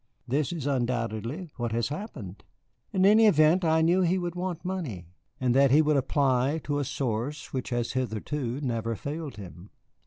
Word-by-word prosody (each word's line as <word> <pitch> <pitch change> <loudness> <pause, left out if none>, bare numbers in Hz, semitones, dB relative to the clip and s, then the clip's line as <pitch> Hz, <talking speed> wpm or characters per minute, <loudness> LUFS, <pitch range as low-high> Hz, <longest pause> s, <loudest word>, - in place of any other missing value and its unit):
This 140 +4 0
is 165 -6 -4
undoubtedly 125 - -2
what 120 -2 -2
has 115 +1 0
happened. 145 - -7 0.5
In 190 0 +2
any 215 +2 +7
event, 160 0 +4
I 160 -1 +3
knew 175 +3 +3
that 180 - +3
he 180 +3 +2
would 175 -2 -3
want 180 -1 -4
money, 155 - -4 0.3
and 125 -2 +1
that 135 +1 +5
he 150 +4 +5
would 150 0 +2
apply 135 +1 +1
to 145 -1 -1
a - - 0
source 135 +1 -3
which 130 -2 -3
has 120 -1 -1
hitherto 130 +2 -3
never 115 -4 -2
failed 150 +4 -5
him." 90 -1 -11
140 Hz, 180 wpm, -27 LUFS, 120-160 Hz, 0.5 s, any